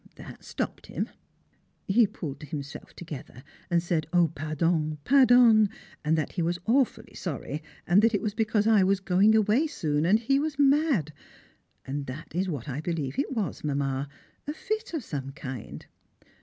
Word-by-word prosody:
That - - -11
stopped - - -5
him! - - -3 0.8
He 220 +3 +5
pulled 150 -6 -7
himself 145 -1 -7
together 145 -6 -9 0.3
and 170 -1 +2
said 165 -3 -1
"Oh! 175 -3 +3
pardon, 155 +1 0
pardon," 245 - +6 0.3
and 160 +1 +2
that 155 - -1
he 180 - -3
was 170 +1 0
awfully 250 +2 +1
sorry, 150 -3 -5 0.2
and 180 +4 +5
that 225 0 +3
it 205 - 0
was 210 -2 -1
because 215 -1 +1
I 220 -2 +5
was 195 +1 +2
going 195 +3 +4
away 220 +8 +3
soon 150 - -1
and 205 +4 +5
he 275 +5 +1
was 300 -1 -2
mad. 280 - +3 0.7
And 140 +1 -4
that 135 +5 -8
is 185 +3 0
what 145 -7 -4
I 140 +1 -3
believe 160 - -3
it 280 - -1
was, 215 - -3
Mamma 140 -1 -1 0.4
a 295 - -2
fit 435 0 -3
of 300 - -3
some 135 -7 -5
kind. 130 -6 -7
175 Hz, 170 wpm, -27 LUFS, 150-225 Hz, 0.8 s, pardon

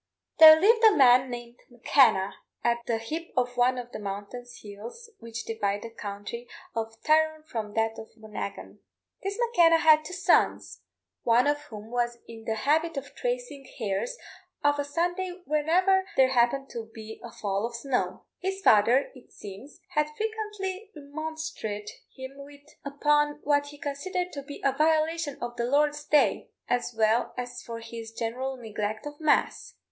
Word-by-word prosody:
There 315 0 +11
lived 450 +5 +4
a 440 -2 +7
man 255 -1 +6
named 240 0 -8
M'Kenna 240 -5 +3 0.3
at 235 0 +2
the 230 - +1
hip 315 +10 -5
of 250 0 +1
one 250 +1 +3
of 245 -1 -6
the - - -6
mountainous 205 +5 -7
hills 225 - -10
which 230 -1 -7
divide 205 -2 -2
the 230 - -7
county 210 +2 -7 0.3
of 225 0 -4
Tyrone 315 0 +3
from 220 -8 -5
that 225 0 0
of 220 - -9
Monaghan. 215 -2 -7 0.4
This 395 +1 -3
M'Kenna 350 -9 +5
had 310 -1 +5
two 360 - -8
sons, 370 - +1 0.4
one 235 +1 +4
of 290 0 +2
whom 215 0 -10
was 240 -1 -1
in 225 -1 -11
the 220 - -1
habit 320 +2 +2
of 275 0 -6
tracing - - -4
hares 225 - -2 0.5
of 290 0 +3
a - - +1
Sunday 355 +4 -2
whenever 365 +6 +2
there 260 -1 +6
happened 265 +2 +2
to 225 -2 -6
be 220 -1 -10
a 235 - -8
fall 200 -1 -2
of 235 - -9
snow. 250 +2 -2
His 385 +1 -3
father, 235 - +4
it 255 -2 -17
seems, 205 - -11
had 300 -4 +1
frequently 425 -2 -4
remonstrated 295 -8 -5 0.3
with 275 +2 -9
him 290 - -24
upon 295 +1 +1
what 285 0 +2
he 290 0 -11
considered 355 +5 -3
to 280 - -5
be 285 +1 -10
a 275 - +5
violation 315 -1 +1
of 240 0 -5
the 235 - 0
Lord's 295 +3 +1
day, 300 -1 +2 0.2
as 245 0 0
well 220 +2 +2
as 245 0 -5
for 230 -1 -7
his 230 0 -8
general 250 +4 -3
neglect 215 -1 -4
of 295 0 -8
mass. 310 -1 +1
270 Hz, 165 wpm, -27 LUFS, 230-315 Hz, 0.5 s, There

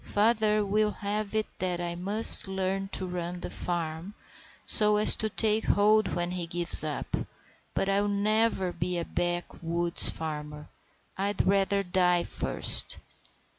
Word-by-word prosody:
Father 215 0 -1
will 210 +2 -1
have 210 +1 -6
it 215 0 -1
that 180 -2 -4
I 175 -1 -6
must 200 +5 +8
learn 190 0 -5
to 190 -1 -5
run 180 0 -7
the - - -8
farm, 170 +2 -7 0.5
so 210 -1 +2
as 210 - +3
to 220 - -3
take 215 +1 -1
hold 215 +1 0
when 175 0 -4
he 180 -2 -6
gives 170 -1 +3
up. 150 -3 -6 0.6
But - - -3
I'll 200 +1 -1
never 205 -2 -2
be 175 +1 -5
a 170 - -5
backwoods 175 -1 0
farmer; 150 -1 -8 0.5
I'd 200 0 -3
rather 200 0 -1
die 180 -1 -1
first!" - - +2
190 Hz, 140 wpm, -25 LUFS, 175-210 Hz, 0.6 s, must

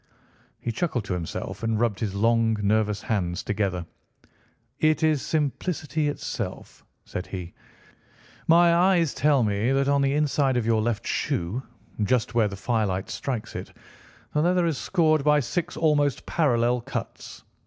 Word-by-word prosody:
He 120 - -3
chuckled 125 - -2
to 100 - -2
himself 85 -2 -5
and 115 -1 0
rubbed 115 -5 0
his 100 -3 -2
long, 115 +1 +2
nervous 105 0 +1
hands 90 -5 -1
together. 95 -4 -1 0.9
"It 155 0 +2
is 155 -3 +3
simplicity 155 0 -1
itself," 145 - -5 0.2
said 90 - -5
he; 90 -3 -6 0.9
"my 170 +1 +6
eyes 175 -3 +3
tell 145 -4 +3
me 105 +3 +1
that 135 0 +2
on 140 0 +3
the 140 0 +2
inside 145 -3 +2
of 120 - 0
your 110 -1 +2
left 110 -2 -1
shoe, 90 +10 -1 0.4
just 110 0 +1
where 115 -3 +3
the 100 - -6
firelight 100 -4 -1
strikes 125 -6 -4
it, - - -7 0.6
the 150 - +2
leather 180 +1 +2
is 160 -5 -1
scored 155 -5 +2
by 150 0 +4
six 155 +6 -3
almost 145 -4 +2
parallel 120 -5 +1
cuts. - - -7
120 Hz, 150 wpm, -25 LUFS, 105-150 Hz, 0.9 s, my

